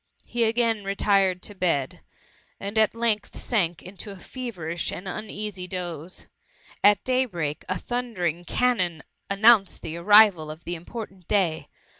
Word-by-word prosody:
He 235 Hz, -1 st, +1 dB
again 225 Hz, -2 st, +1 dB
retired 195 Hz, -2 st, +2 dB
to 205 Hz, -, -5 dB
bed, 165 Hz, -9 st, -1 dB, 0.6 s
and 200 Hz, +2 st, -5 dB
at 220 Hz, 0 st, +3 dB
length 225 Hz, -3 st, 0 dB
sank 175 Hz, -8 st, 0 dB
into 195 Hz, +3 st, -9 dB
a 200 Hz, -, -8 dB
feverish 185 Hz, -7 st, -4 dB
and 185 Hz, -, -7 dB
uneasy 210 Hz, -1 st, -5 dB
dose. 175 Hz, -2 st, -5 dB, 0.6 s
At 205 Hz, 0 st, +5 dB
daybreak, 195 Hz, -, -1 dB
a 185 Hz, -, 0 dB
thundering 210 Hz, -9 st, -2 dB
of 175 Hz, -, -18 dB
cannon 185 Hz, -, 0 dB, 0.3 s
announced 200 Hz, 0 st, +4 dB
the 165 Hz, +1 st, -5 dB
arrival 195 Hz, -3 st, +6 dB
of 155 Hz, +2 st, -9 dB
the 175 Hz, -, -4 dB
important 190 Hz, +1 st, -8 dB
day. 165 Hz, -7 st, +1 dB
195 Hz, 140 wpm, -25 LUFS, 175-220 Hz, 0.6 s, arrival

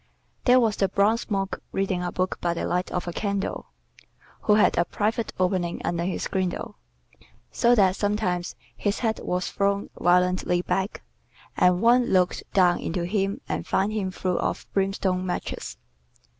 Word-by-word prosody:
There 250 Hz, +1 st, +6 dB
was 225 Hz, -3 st, +1 dB
the 195 Hz, -, +2 dB
bronze 210 Hz, +5 st, +1 dB
monk 195 Hz, -2 st, -1 dB, 0.2 s
reading 190 Hz, -2 st, -1 dB
a 175 Hz, 0 st, -2 dB
book 185 Hz, 0 st, -2 dB
by 170 Hz, -1 st, 0 dB
the -, -, -2 dB
light 180 Hz, +1 st, -1 dB
of 180 Hz, 0 st, -3 dB
a 175 Hz, -, -3 dB
candle, 200 Hz, 0 st, -2 dB, 0.7 s
who 210 Hz, -, +4 dB
had 210 Hz, -, +4 dB
a 170 Hz, -, +3 dB
private 215 Hz, +5 st, -1 dB
opening 180 Hz, -2 st, 0 dB
under 170 Hz, 0 st, -1 dB
his 185 Hz, -, -2 dB
girdle, 190 Hz, +3 st, -3 dB, 0.7 s
so 240 Hz, 0 st, +4 dB
that 190 Hz, -4 st, +4 dB
sometimes 205 Hz, -4 st, -1 dB, 0.2 s
his 205 Hz, 0 st, -1 dB
head 220 Hz, -2 st, 0 dB
was 180 Hz, 0 st, -2 dB
thrown 200 Hz, 0 st, 0 dB
violently 180 Hz, 0 st, +2 dB
back, 190 Hz, +3 st, -2 dB, 0.5 s
and 180 Hz, +2 st, +3 dB
one 245 Hz, +1 st, +5 dB
looked 180 Hz, -1 st, +2 dB
down 180 Hz, -2 st, +4 dB
into 170 Hz, +1 st, -2 dB
him 195 Hz, +2 st, -1 dB
and -, -, -3 dB
found 195 Hz, +3 st, +1 dB
him 200 Hz, -3 st, -1 dB
full 185 Hz, -1 st, -2 dB
of -, -, -2 dB
brimstone 195 Hz, -1 st, 0 dB
matches. 180 Hz, -1 st, -4 dB
190 Hz, 160 wpm, -25 LUFS, 180-205 Hz, 0.7 s, There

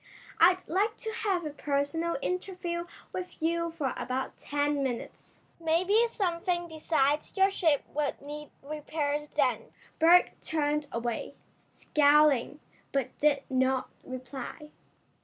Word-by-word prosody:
"I'd 365 Hz, +2 st, +5 dB
like 410 Hz, +5 st, +1 dB
to 445 Hz, -, -4 dB
have 390 Hz, -7 st, 0 dB
a 300 Hz, -, -3 dB
personal 290 Hz, +3 st, -1 dB
interview 360 Hz, -2 st, -3 dB, 0.3 s
with 365 Hz, 0 st, -6 dB
you 335 Hz, +1 st, 0 dB
for 305 Hz, -6 st, -2 dB
about 260 Hz, +1 st, -3 dB
ten 290 Hz, 0 st, -1 dB
minutes. 255 Hz, -3 st, -5 dB, 0.2 s
Maybe 365 Hz, +8 st, +3 dB
something 350 Hz, -4 st, -1 dB
besides 305 Hz, -1 st, 0 dB
your 385 Hz, +1 st, +5 dB
ship 320 Hz, -7 st, +2 dB
would 295 Hz, -1 st, -1 dB
need 295 Hz, +1 st, -8 dB
repairs 295 Hz, 0 st, -2 dB
then." 250 Hz, -6 st, +1 dB, 0.3 s
Berg 345 Hz, +3 st, +6 dB
turned 300 Hz, -1 st, 0 dB
away, 235 Hz, 0 st, -3 dB, 0.3 s
scowling, 295 Hz, -2 st, +3 dB, 0.3 s
but 275 Hz, -3 st, -1 dB
did 285 Hz, -2 st, +3 dB
not 260 Hz, 0 st, +1 dB
reply. 255 Hz, +4 st, -7 dB
300 Hz, 120 wpm, -29 LUFS, 280-345 Hz, 0.3 s, Berg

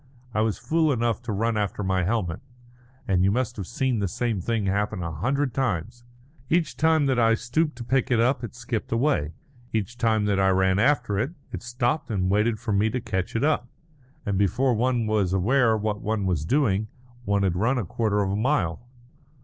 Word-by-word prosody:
I 105 Hz, -, +1 dB
was 110 Hz, -2 st, 0 dB
fool 160 Hz, -1 st, +1 dB
enough 120 Hz, -2 st, 0 dB
to 120 Hz, -2 st, -5 dB
run 110 Hz, +2 st, 0 dB
after 105 Hz, 0 st, -2 dB
my 95 Hz, -1 st, +1 dB
helmet; 90 Hz, -3 st, -1 dB, 0.7 s
and 95 Hz, -3 st, +2 dB
you 95 Hz, -, +4 dB
must 120 Hz, +2 st, -1 dB
have 95 Hz, -4 st, -5 dB
seen 125 Hz, -1 st, -1 dB
the 100 Hz, -, 0 dB
same 110 Hz, +2 st, -2 dB
thing 115 Hz, +1 st, -1 dB
happen 100 Hz, 0 st, -1 dB
a 85 Hz, -, -3 dB
hundred 130 Hz, -, -1 dB
times 120 Hz, -1 st, -2 dB, 0.4 s
each 165 Hz, -2 st, +1 dB
time 160 Hz, -1 st, +3 dB
that 130 Hz, -2 st, +1 dB
I 115 Hz, -1 st, +4 dB
stooped 150 Hz, +7 st, -1 dB
to 120 Hz, -, -7 dB
pick 130 Hz, +2 st, 0 dB
it 120 Hz, -3 st, +2 dB
up 125 Hz, +3 st, +2 dB
it 115 Hz, -, -6 dB
skipped 120 Hz, -3 st, -4 dB
away; 115 Hz, -, +1 dB, 0.4 s
each 110 Hz, +3 st, -3 dB
time 110 Hz, -2 st, +2 dB
that 100 Hz, -1 st, +1 dB
I 95 Hz, 0 st, +4 dB
ran 95 Hz, 0 st, +2 dB
after 120 Hz, -5 st, +2 dB
it, 130 Hz, +9 st, -1 dB, 0.2 s
it -, -, -5 dB
stopped 125 Hz, +5 st, -1 dB
and 95 Hz, -4 st, 0 dB
waited 105 Hz, +2 st, +2 dB
for 115 Hz, -1 st, -4 dB
me 105 Hz, +2 st, +2 dB
to 125 Hz, +4 st, -2 dB
catch 95 Hz, -4 st, -3 dB
it 115 Hz, -, 0 dB
up. 145 Hz, -5 st, +1 dB, 0.6 s
And 100 Hz, -2 st, 0 dB
before 125 Hz, +6 st, +2 dB
one 120 Hz, 0 st, +1 dB
was 105 Hz, -4 st, +1 dB
aware 115 Hz, +4 st, +3 dB
what 105 Hz, 0 st, -2 dB
one 110 Hz, -2 st, -1 dB
was 85 Hz, -5 st, 0 dB
doing, 110 Hz, -, +1 dB, 0.4 s
one 100 Hz, -1 st, +1 dB
had 95 Hz, -3 st, +1 dB
run 115 Hz, +8 st, +1 dB
a 120 Hz, -, -1 dB
quarter 105 Hz, +2 st, 0 dB
of 95 Hz, -, -1 dB
a -, -, 0 dB
mile. 105 Hz, -, 0 dB
110 Hz, 205 wpm, -25 LUFS, 100-125 Hz, 0.7 s, you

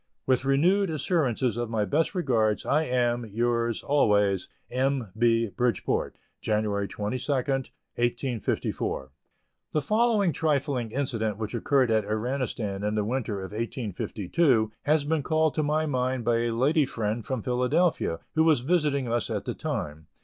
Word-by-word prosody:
With 130 Hz, 0 st, +2 dB
renewed 175 Hz, +9 st, +3 dB
assurances 135 Hz, -, 0 dB
of 120 Hz, -1 st, -2 dB
my 110 Hz, -2 st, 0 dB
best 160 Hz, -, 0 dB
regards, 115 Hz, -, +1 dB
I 155 Hz, +3 st, +2 dB
am, 120 Hz, -2 st, +1 dB
yours, 115 Hz, +1 st, -1 dB
always, 105 Hz, -9 st, +2 dB, 0.2 s
M. 130 Hz, -4 st, 0 dB
B. 115 Hz, -1 st, +2 dB
BRIDGEPORT, 120 Hz, +4 st, -1 dB, 0.3 s
January 105 Hz, -2 st, 0 dB
22, 120 Hz, +9 st, -3 dB
1854. 125 Hz, -, -2 dB, 0.6 s
The 150 Hz, -, +2 dB
following 215 Hz, -1 st, +2 dB
trifling 140 Hz, -6 st, 0 dB
incident 110 Hz, -5 st, -2 dB
which 110 Hz, -1 st, -4 dB
occurred 130 Hz, 0 st, +2 dB
at 110 Hz, -1 st, +3 dB
Iranistan 110 Hz, -3 st, -2 dB
in 105 Hz, +1 st, 0 dB
the 105 Hz, -1 st, 0 dB
winter 110 Hz, -4 st, -2 dB
of 95 Hz, -, -7 dB
1852, 110 Hz, -, 0 dB
has 150 Hz, 0 st, +3 dB
been 160 Hz, 0 st, +1 dB
called 155 Hz, +1 st, +1 dB
to 155 Hz, -, 0 dB
my 155 Hz, +1 st, +1 dB
mind 130 Hz, -3 st, -1 dB
by 115 Hz, -1 st, +2 dB
a -, -, 0 dB
lady 145 Hz, +4 st, +3 dB
friend 110 Hz, -1 st, -2 dB
from 130 Hz, -3 st, -3 dB
Philadelphia, 125 Hz, -, +1 dB, 0.2 s
who 160 Hz, -, +3 dB
was 155 Hz, -6 st, +4 dB
visiting 145 Hz, -3 st, +1 dB
us 120 Hz, +1 st, 0 dB
at 105 Hz, -3 st, -3 dB
the -, -, -2 dB
time. 85 Hz, -, -4 dB
125 Hz, 145 wpm, -27 LUFS, 110-145 Hz, 0.6 s, was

